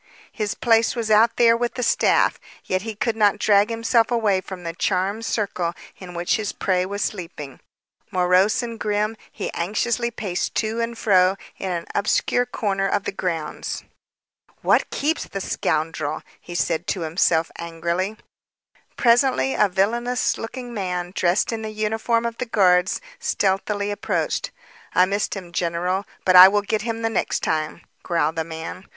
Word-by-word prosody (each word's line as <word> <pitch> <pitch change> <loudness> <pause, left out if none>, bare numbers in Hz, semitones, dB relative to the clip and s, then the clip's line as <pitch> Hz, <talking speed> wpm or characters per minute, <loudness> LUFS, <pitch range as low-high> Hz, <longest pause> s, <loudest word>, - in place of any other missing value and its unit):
His 210 -3 -3
place 225 -1 +3
was 225 -2 -2
out 225 +2 +5
there 230 -1 +5
with 240 0 -2
the 250 - -2
staff. - - +3 0.3
Yet 185 0 0
he 220 +1 -6
could 220 +2 -1
not 210 -1 +3
drag 205 0 +4
himself 230 0 +2
away 215 -6 +2
from 185 -1 -9
the 165 -1 -4
charmed 195 +5 -1
circle 185 -6 -1 0.2
in 180 -2 -10
which 175 0 +1
his 215 -2 -3
prey 185 -1 0
was 200 +1 -2
sleeping. 165 -8 -6 0.5
Morose 185 +5 +3
and 230 -1 -6
grim, 210 +1 0 0.2
he - - -5
anxiously 230 +6 -1
paced 195 -6 -3
to 225 +1 -1
and 230 0 -3
fro 185 -3 +4 0.2
in 190 - -3
an 170 -1 -3
obscure 245 +4 +1
corner 195 -5 -1
of 200 0 0
the - - -3
grounds. 170 -5 -4 0.8
"What - - +3
keeps 310 +3 -1
the 195 - -5
scoundrel?" 155 -4 -2 0.2
he 175 - -9
said 170 0 -1
to 185 - -1
himself 165 0 +1
angrily. 170 +5 -2 0.8
Presently, 235 - +3
a 205 - +3
villainous 235 +6 +1
looking 245 +1 -6
man 180 -4 -3
dressed 180 +6 +2
in 225 -1 -3
the 220 - -4
uniform 220 +2 0
of 230 0 -4
the 250 - -3
guards, 185 -4 +3 0.2
stealthily 205 - 0
approached. 205 - -1 0.5
"I 180 - +6
missed 200 +3 -1
him, 180 -3 -8
general, 180 +3 -1 0.2
but 185 - +4
I 180 +1 +12
will 205 +1 +1
get 215 +1 -1
him 230 0 -4
the 225 - +1
next 225 - -1
time." 155 +1 -1 0.2
growled 165 -2 0
the 160 - +1
man. 160 +3 -7
200 Hz, 165 wpm, -22 LUFS, 180-225 Hz, 0.8 s, I